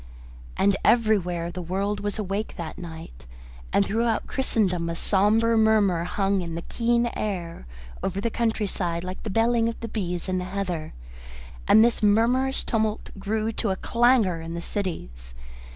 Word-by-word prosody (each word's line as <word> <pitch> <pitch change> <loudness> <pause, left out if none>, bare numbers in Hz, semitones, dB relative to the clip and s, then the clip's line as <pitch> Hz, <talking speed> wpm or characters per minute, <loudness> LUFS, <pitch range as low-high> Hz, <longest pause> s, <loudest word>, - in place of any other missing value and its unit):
And 200 0 +3
everywhere 180 -7 +2
the 180 +1 -5
world 195 +4 -2
was 205 +1 -3
awake 205 0 -3
that 165 -2 -6
night, 165 - -10 0.4
and 200 - +3
throughout 230 +2 0
Christendom 185 -10 0
a 165 - -3
sombre 215 +6 +3
murmur 210 -6 +3
hung 195 +1 0
in 170 -2 -5
the 170 - -5
keen 235 0 +1
air 175 - -4 0.3
over 195 0 -2
the 230 +3 -1
country 225 -2 0
side 175 -3 -2
like 185 +1 -6
the 220 - -5
belling 230 +2 +2
of 230 - -6
bees 180 -5 -3
in 185 0 0
the 180 - -4
heather, 185 - -4 0.7
and 220 +2 +7
this 240 - +1
murmurous 240 +6 +2
tumult 220 -1 -1
grew 215 +2 -1
to 220 -1 -2
a 190 - +1
clangour 230 -7 +2
in 165 +1 -6
the - - -3
cities. - - -5
200 Hz, 160 wpm, -25 LUFS, 175-225 Hz, 0.7 s, and